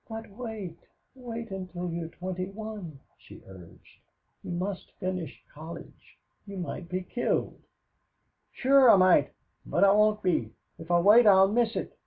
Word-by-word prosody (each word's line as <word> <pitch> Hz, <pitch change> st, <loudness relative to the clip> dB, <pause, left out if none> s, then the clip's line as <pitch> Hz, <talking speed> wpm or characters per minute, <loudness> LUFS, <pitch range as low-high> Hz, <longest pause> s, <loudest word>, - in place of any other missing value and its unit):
"But 225 Hz, -1 st, -8 dB
wait 210 Hz, -6 st, -7 dB, 0.3 s
wait 235 Hz, -4 st, -8 dB
until 180 Hz, -2 st, -5 dB
you're 170 Hz, -1 st, -4 dB
twenty 185 Hz, +1 st, -5 dB
one," 200 Hz, -8 st, -8 dB, 0.2 s
she -, -, -15 dB
urged. 90 Hz, -3 st, -16 dB, 0.4 s
"You -, -, -8 dB
must 185 Hz, +2 st, -4 dB
finish 185 Hz, -3 st, -5 dB
college. 160 Hz, +3 st, -12 dB, 0.3 s
You 200 Hz, -1 st, -8 dB
might 175 Hz, -1 st, -6 dB
be 185 Hz, 0 st, -3 dB
killed." 240 Hz, +6 st, -2 dB, 0.9 s
"Sure, 270 Hz, -1 st, +5 dB
I -, -, +9 dB
might 185 Hz, -1 st, +4 dB, 0.3 s
but -, -, 0 dB
I 195 Hz, -, +6 dB
won't 210 Hz, +1 st, +3 dB
be. 180 Hz, -3 st, 0 dB, 0.3 s
If 165 Hz, 0 st, -11 dB
I 175 Hz, -, +4 dB
wait 210 Hz, +6 st, +6 dB
I'll 190 Hz, -1 st, +6 dB
miss 230 Hz, +1 st, +1 dB
it. -, -, -5 dB
190 Hz, 150 wpm, -28 LUFS, 175-220 Hz, 0.9 s, I